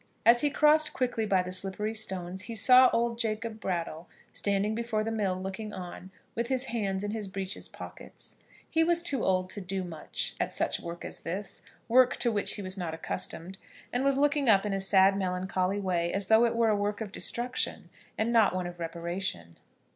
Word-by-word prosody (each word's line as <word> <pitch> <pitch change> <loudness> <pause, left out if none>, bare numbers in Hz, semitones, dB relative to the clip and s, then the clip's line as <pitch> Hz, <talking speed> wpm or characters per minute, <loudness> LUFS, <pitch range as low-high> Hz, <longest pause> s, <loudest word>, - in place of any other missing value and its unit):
As 235 +1 +7
he 295 - +3
crossed 305 +2 +4
quickly 240 -4 -1
by 190 -2 +3
the 180 - -6
slippery 195 +3 0
stones 190 -3 -4
he 230 - -4
saw 250 +3 +7
old 235 0 0
Jacob 220 -1 -2
Brattle 170 -4 -3 0.3
standing 200 +1 0
before 225 -1 -1
the 225 - -2
mill 195 -4 -1
looking 195 +3 -5
on, 180 +1 -8 0.2
with 235 +1 -2
his 260 0 0
hands 195 -4 -1
in 205 - -2
his 215 -2 -4
breeches 190 0 -4
pockets. - - -9 0.3
He 325 0 +2
was 340 0 +2
too 280 -8 +1
old 185 -1 +1
to 205 - -6
do 190 +1 -3
much 165 -4 -3
at - - -1
such - - 0
work 170 0 -7
as - - -7
this, 190 +3 -5 0.3
work 250 +1 +5
to 235 - +2
which 205 -2 +1
he 205 - -6
was 185 +1 -5
not 165 -3 -3
accustomed 175 +3 -5 0.3
and 245 +2 +1
was 275 -1 +2
looking 290 -2 +2
up 200 -1 +5
in 205 - -1
a 195 - 0
sad 195 0 +5
melancholy 185 0 -1
way, 175 -3 0
as 195 0 -1
though 220 +2 +6
it 235 - 0
were 230 -1 +3
a 215 - +3
work 205 0 -1
of 215 -3 -5
destruction, 245 +4 -1 0.3
and 225 +2 0
not 220 -5 +4
one 185 -1 -1
of 175 0 -7
reparation. 170 - -4
205 Hz, 200 wpm, -29 LUFS, 185-230 Hz, 0.3 s, As